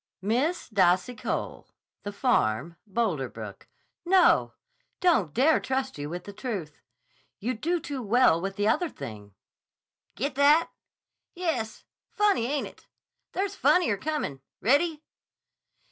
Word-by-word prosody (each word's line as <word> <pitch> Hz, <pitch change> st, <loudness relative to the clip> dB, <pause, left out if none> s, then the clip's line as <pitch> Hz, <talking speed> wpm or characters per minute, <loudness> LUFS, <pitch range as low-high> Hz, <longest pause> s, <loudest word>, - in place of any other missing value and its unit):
'Miss 250 Hz, -, 0 dB
Dassy 185 Hz, +2 st, +2 dB
Cole, 215 Hz, -, -4 dB, 0.3 s
The 205 Hz, -, -5 dB
Farm, 170 Hz, -, +1 dB
Boulder 190 Hz, -, -1 dB
Brook. -, -, -9 dB, 0.4 s
No. 365 Hz, +1 st, +4 dB, 0.5 s
Don't 320 Hz, -, +3 dB
dare 280 Hz, -, +4 dB
trust 265 Hz, -, -2 dB
you 145 Hz, +1 st, -4 dB
with 175 Hz, +2 st, -5 dB
the 205 Hz, -, -9 dB
truth. 195 Hz, -, -5 dB, 0.6 s
You 245 Hz, +5 st, -2 dB
do 335 Hz, +10 st, -1 dB
too 285 Hz, -4 st, -5 dB
well 230 Hz, -6 st, +4 dB
with 195 Hz, +1 st, -3 dB
the 205 Hz, +1 st, 0 dB
other 315 Hz, +9 st, +2 dB
thing' 105 Hz, -, -9 dB, 0.8 s
Get 275 Hz, +7 st, -2 dB
that?... 290 Hz, +4 st, +4 dB, 0.6 s
yes's 320 Hz, -12 st, -2 dB, 0.3 s
funny, 405 Hz, -, +2 dB
ain't 285 Hz, +2 st, -1 dB
it? -, -, -14 dB, 0.5 s
There's 390 Hz, +1 st, -1 dB
funnier 350 Hz, -, +3 dB
comin'. 295 Hz, -, -3 dB, 0.2 s
Ready?... 300 Hz, +6 st, +2 dB
240 Hz, 125 wpm, -27 LUFS, 190-305 Hz, 0.8 s, No